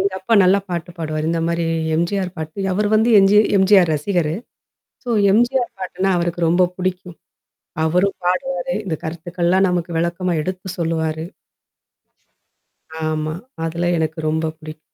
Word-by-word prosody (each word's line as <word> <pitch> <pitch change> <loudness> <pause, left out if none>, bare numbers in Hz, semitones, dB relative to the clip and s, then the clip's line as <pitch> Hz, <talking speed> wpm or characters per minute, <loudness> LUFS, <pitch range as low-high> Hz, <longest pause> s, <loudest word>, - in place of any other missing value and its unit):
எங்க 195 0 0
அப்பா 225 +5 +1
நல்லா 190 +2 +4
பாட்டு 175 0 -4
பாடுவாரு. 155 -1 -3
இந்த 165 -1 0
மாரி 170 0 -1 0.3
எம்ஜிஆர் 185 +2 -1
பாட்டு 160 +5 -4
அவரு 205 +2 +1
வந்து 220 +2 +3
என்ஜி 195 +2 +5 0.2
எம்ஜிஆர் 190 -3 +5
ரசிகரு. 160 0 0 0.7
சோ 245 - -6 0.2
எம்ஜிஆர் 240 +3 +2
பாட்டுன்னா 190 +1 -1
அவருக்கு 170 0 -1
ரொம்ப 175 +2 +3
புடிக்கும். 180 -1 -4 0.7
அவரும் 180 +5 +1
பாடுவாரு. 265 +7 -1
இந்த 175 - -2
கருத்துக்கள்லாம் 175 +3 0
நமக்கு 175 -1 -2
விளக்கமா 175 +1 -1
எடுத்து 185 +2 -5
சொல்லுவாரு. 160 -1 -1 1.8
ஆமா. 155 0 -2 0.3
அதல்லாம் 170 +1 0
எனக்கு 160 +1 -2
ரொம்ப 160 +1 0
பிடிக்கும். 155 0 -10
175 Hz, 135 wpm, -20 LUFS, 160-195 Hz, 1.8 s, என்ஜி